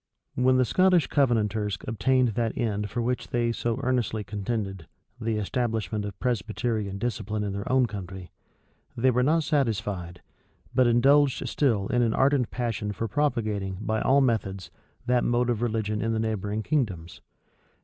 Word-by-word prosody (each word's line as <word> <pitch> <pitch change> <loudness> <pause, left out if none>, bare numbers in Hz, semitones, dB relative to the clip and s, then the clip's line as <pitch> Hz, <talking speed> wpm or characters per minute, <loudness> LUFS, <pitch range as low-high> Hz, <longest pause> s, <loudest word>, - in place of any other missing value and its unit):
When 130 +1 +3
the 130 - +4
Scottish 185 +4 +4
Covenanters 110 -7 +1
obtained 125 +2 +2
that 115 0 -2
end 105 -3 -1
for 120 +3 -2
which 125 +1 -2
they 120 -1 0
so 115 0 -2
earnestly 120 -4 0
contended, 100 -3 -4 0.3
the 115 -2 -1
establishment 110 -1 -2
of 100 -2 -7
Presbyterian 110 -3 -2
discipline 110 -2 -2
in 100 -1 -3
their 100 +3 -4
own 130 -1 +4
country, 95 -4 -7 0.7
they 130 +2 +3
were 125 +1 +2
not 155 +5 +3
satisfied, 105 - -1 0.5
but 125 -1 +4
indulged 135 +4 +4
still 115 -9 +1
in 125 - +2
an 115 -2 +1
ardent 135 -3 +2
passion 115 -4 -2
for 115 - -3
propagating, 105 -7 -1
by 110 0 -1
all 140 +2 +4
methods, 100 -8 -1 0.3
that 125 0 +2
mode 120 0 +1
of 115 -2 -2
religion 110 -2 -1
in 115 0 0
the 110 - 0
neighboring 110 -1 -2
kingdoms. 95 - -2
115 Hz, 155 wpm, -26 LUFS, 105-125 Hz, 0.7 s, the